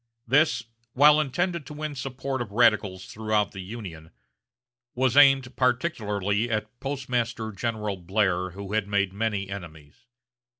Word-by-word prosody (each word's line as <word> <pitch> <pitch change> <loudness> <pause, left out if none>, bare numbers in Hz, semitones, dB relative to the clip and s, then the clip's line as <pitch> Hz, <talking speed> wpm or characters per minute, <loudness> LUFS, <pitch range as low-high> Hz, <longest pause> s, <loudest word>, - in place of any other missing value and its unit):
This, 130 -2 +3 0.3
while 150 +3 +6
intended 170 +3 -1
to 150 - -8
win 155 0 -4
support 135 0 -4
of 120 - -4
radicals 105 -4 +2
throughout 110 -1 -1
the 95 - -9
Union, 90 -6 -8 0.9
was 130 0 +1
aimed 135 -3 +5
particularly 115 - 0
at 110 -2 0
Postmaster 125 -5 -2
General 105 -2 -3
Blair, 95 0 0
who 100 +2 -8
had 110 -2 0
made 100 -2 0
many 105 -2 -1
enemies. 85 - -10
110 Hz, 130 wpm, -26 LUFS, 100-130 Hz, 0.9 s, while